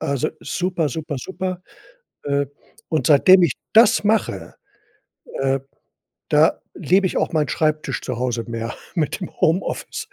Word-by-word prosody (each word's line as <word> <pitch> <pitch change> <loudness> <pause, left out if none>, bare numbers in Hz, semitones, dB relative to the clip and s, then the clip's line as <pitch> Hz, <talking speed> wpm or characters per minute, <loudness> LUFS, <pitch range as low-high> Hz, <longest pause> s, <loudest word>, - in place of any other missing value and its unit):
Also, 140 +2 -1
super, 180 -4 -1
super, 150 +1 -5
super. 185 +4 -5 0.6
Äh, 140 0 0 0.4
und 160 - 0
seitdem 180 +5 +7
ich 165 - +2 0.2
das 225 0 +6
mache, 215 0 -1 0.9
äh, 135 0 +1 0.7
da - - +3
liebe 190 +2 +2
ich - - -3
auch - - 0
meinen 150 -4 +1
Schreibtisch 155 -3 -1
zu 125 -3 -4
Hause 120 -2 -2
mehr, 115 0 -4 0.2
mit 165 +2 -1
dem 180 - -5
Homeoffice. 190 - -1
155 Hz, 135 wpm, -21 LUFS, 135-185 Hz, 0.9 s, seitdem